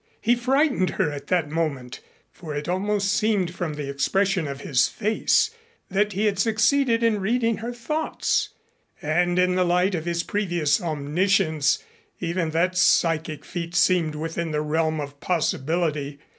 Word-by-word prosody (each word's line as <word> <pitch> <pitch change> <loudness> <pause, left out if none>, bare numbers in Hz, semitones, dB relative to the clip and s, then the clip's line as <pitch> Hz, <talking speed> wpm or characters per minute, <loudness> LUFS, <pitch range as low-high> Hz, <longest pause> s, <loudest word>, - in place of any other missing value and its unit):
He 235 - +3
frightened 260 -4 +1
her 150 - +1
at 145 -1 -8
that 170 -5 0
moment, 140 -6 -3 0.3
for 155 -4 -8
it 145 0 -4
almost 200 +2 0
seemed 205 -6 +1
from 175 -4 -4
the 145 -2 -5
expression 180 +6 0
of 140 0 -6
his 135 -3 +2
face 220 - +1 0.4
that 205 +2 +1
he 205 +4 0
had 200 -3 0
succeeded 230 +3 +2
in 225 -2 +2
reading 230 +2 +1
her 230 +2 -5
thoughts 275 +7 -1 0.5
and 175 +4 +1
in 180 0 +3
the 185 0 +2
light 180 +2 +2
of 165 -2 -3
his 170 0 -1
previous 175 -7 0
omniscience 160 - +1 0.4
even 170 -1 -1
that 175 +3 0
psychic 165 -4 +2
feat 170 -1 -5
seemed 170 -5 +2
within 165 +2 -3
the 150 -1 -1
realm 155 +1 0
of 145 -1 -7
possibility. 155 -3 -1
175 Hz, 155 wpm, -24 LUFS, 155-205 Hz, 0.5 s, He